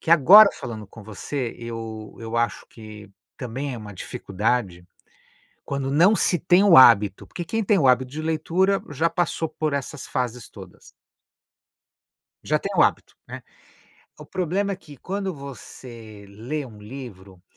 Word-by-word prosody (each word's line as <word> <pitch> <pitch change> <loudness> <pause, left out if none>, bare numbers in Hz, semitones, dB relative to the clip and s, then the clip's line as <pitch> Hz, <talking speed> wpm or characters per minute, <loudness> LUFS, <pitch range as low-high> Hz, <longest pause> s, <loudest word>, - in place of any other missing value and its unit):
que 165 - -5
agora 195 +7 +8
falando 110 -3 -8
com 110 +2 -14
você, 115 +5 -5
eu 115 -2 -7
eu 115 +1 -5
acho 115 -2 -1
que 105 -3 -13 0.3
também 130 +3 -5
é - - -7
uma 105 -2 -10
dificuldade 100 -1 -3 0.8
quando 140 -2 -3
não 175 +9 +4
se 180 - +1
tem 180 +5 +4
o 190 -7 +7
hábito, 105 -6 +6
porque 175 - -6
quem 225 +4 -2
tem 200 0 +2
o 135 - +3
hábito 130 0 +2
de 155 +3 -5
leitura 165 +5 0
já 160 +4 0
passou 165 -2 -2
por 155 -1 -3
essas 140 +1 -5
fases 125 -3 -4
todas. - - -14 1.6
Já - - +1
tem - - -5
o - - +4
hábito, - - 0
né, - - -8 0.8
o - - -10
problema 190 +3 -2
é - - -5
que 145 -5 -15
quando 195 +5 -4
você 120 -6 -11
lê 120 +9 -5
um 110 -3 -14
livro, 105 -6 -11
130 Hz, 155 wpm, -23 LUFS, 110-160 Hz, 1.6 s, agora